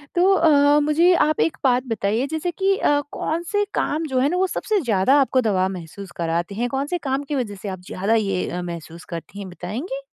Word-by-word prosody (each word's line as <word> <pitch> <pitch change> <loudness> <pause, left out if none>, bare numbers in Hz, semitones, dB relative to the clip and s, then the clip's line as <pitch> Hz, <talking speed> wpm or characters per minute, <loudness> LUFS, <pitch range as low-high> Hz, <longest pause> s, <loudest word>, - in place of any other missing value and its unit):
तो 360 +2 +4
अ, 295 -4 +5
मुझे 325 +5 +4
आप 310 - -1
एक 325 - +1
बात 250 -2 +3
बताइए 225 +2 -1
जैसे 320 +3 -2
कि 390 +3 +1
अ, 290 -6 +2
कौन 330 +2 -2
से 410 0 +2
काम 310 +3 -1
जो 260 -3 0
हैं 270 +3 +3
ना 360 - -1
वो 380 +1 +2
सबसे 425 +3 -1
ज़्यादा 240 - +3
आपको 260 -1 +2
दबाव 190 -5 +1
महसूस 185 +1 -9
कराते 170 +3 -2
हैं, 240 +3 -1
कौन 270 +2 -1
से 355 - -1
काम 275 -3 -2
की 285 +1 -4
वजह 235 -7 -2
से 205 - -4
आप 185 -1 -6
ज़्यादा 195 +4 -1
ये 195 -4 0
अ, 180 - -4
महसूस 170 -1 -8
करती 170 +4 -8
हैं 195 -2 -7
बताएँगी? 245 - -6
255 Hz, 225 wpm, -22 LUFS, 195-310 Hz, -, अ